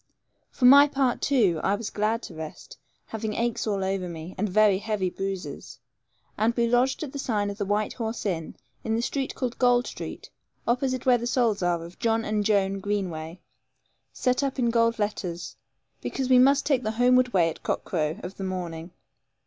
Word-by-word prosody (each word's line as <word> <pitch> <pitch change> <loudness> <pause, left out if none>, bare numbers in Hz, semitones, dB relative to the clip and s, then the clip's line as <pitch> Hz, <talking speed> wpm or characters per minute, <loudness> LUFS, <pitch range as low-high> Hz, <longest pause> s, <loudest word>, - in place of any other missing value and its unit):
For 250 - -1
my 280 +3 +9
part, 270 -3 0
too, 205 - +2
I 195 - +2
was 220 +1 -5
glad 220 +3 0
to - - -8
rest, 160 - -9 0.3
having 220 -1 -4
aches 235 -1 -1
all 200 -2 0
over 190 -1 -2
me, 165 +2 -8
and 210 +2 -1
very 205 0 +4
heavy 205 -4 -2
bruises; 195 0 -5 0.6
and 225 +2 +2
we 235 - +2
lodged 245 +5 +2
at 290 - -6
the 280 - -6
sign 210 -6 -1
of 200 - -10
the 200 - -2
White 210 +1 0
Horse 225 -1 -4
Inn, 165 -5 -3 0.3
in 220 - -1
the 230 - -1
street 270 +1 -2
called 250 -2 -3
Gold 245 -1 +4
Street, - - -8 0.4
opposite 255 +1 0
where 250 -2 +5
the 240 - -3
souls 235 -5 +1
are 175 -2 0
of 170 +1 -13
John 225 -1 +1
and 210 -1 0
Joan 195 -2 +1
Greenway, 185 -5 -3 0.7
set 250 +1 0
up 275 -1 -2
in 240 -2 +1
gold 230 0 +2
letters, 200 -5 -3 0.5
because 265 -1 -3
we 250 - +7
must 275 +2 +4
take 275 -4 +2
the 215 -2 -2
homeward 250 0 +4
way 175 -5 +3
at - - -12
cockcrow 160 +3 -2
of 180 +2 -7
the 195 - -5
morning. 175 -3 -4
215 Hz, 190 wpm, -26 LUFS, 190-245 Hz, 0.7 s, my